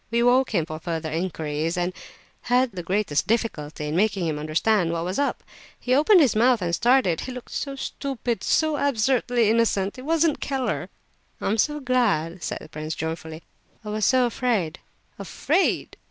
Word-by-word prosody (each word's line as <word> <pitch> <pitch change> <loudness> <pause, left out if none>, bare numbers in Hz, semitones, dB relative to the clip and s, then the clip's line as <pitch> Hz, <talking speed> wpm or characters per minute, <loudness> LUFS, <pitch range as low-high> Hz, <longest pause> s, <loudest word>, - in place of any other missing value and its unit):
We 235 +1 +1
awoke 250 +2 +4
him 165 -4 +2
for 155 0 -7
further 160 -1 -4
inquiries, 160 -1 -2
and 175 +1 -1 0.6
had 250 0 +3
the 185 -3 -6
greatest 185 -3 0
difficulty 160 -10 -2
in 150 - -2
making 195 -1 +1
him 155 -2 -2
understand 165 +4 +1
what 165 0 -2
was 185 +8 -2
up. 285 - -1 0.4
He 250 - 0
opened 330 +7 +6
his 265 -8 +3
mouth 240 +2 +4
and 170 -1 -1
stared—he 240 -1 +2
looked 250 -1 -9
so 275 -1 -4
stupid 265 -3 -3
and - - -13
so 315 -2 +2
absurdly 245 -3 +2
innocent. 220 -2 +1
It - - -7
wasn't 325 0 +2
Keller." 270 -2 -2 0.5
"Oh, - - -2
I'm 220 +2 0
so 300 +4 +1
glad!" 210 - 0
said - - -3
the - - -12
prince, 155 +1 -5
joyfully. 160 0 -5 0.4
"I - - -5
was 215 0 -2
so 255 -1 +4
afraid." 235 -9 -1 0.4
"Afraid! - - 0
215 Hz, 175 wpm, -24 LUFS, 165-255 Hz, 0.6 s, opened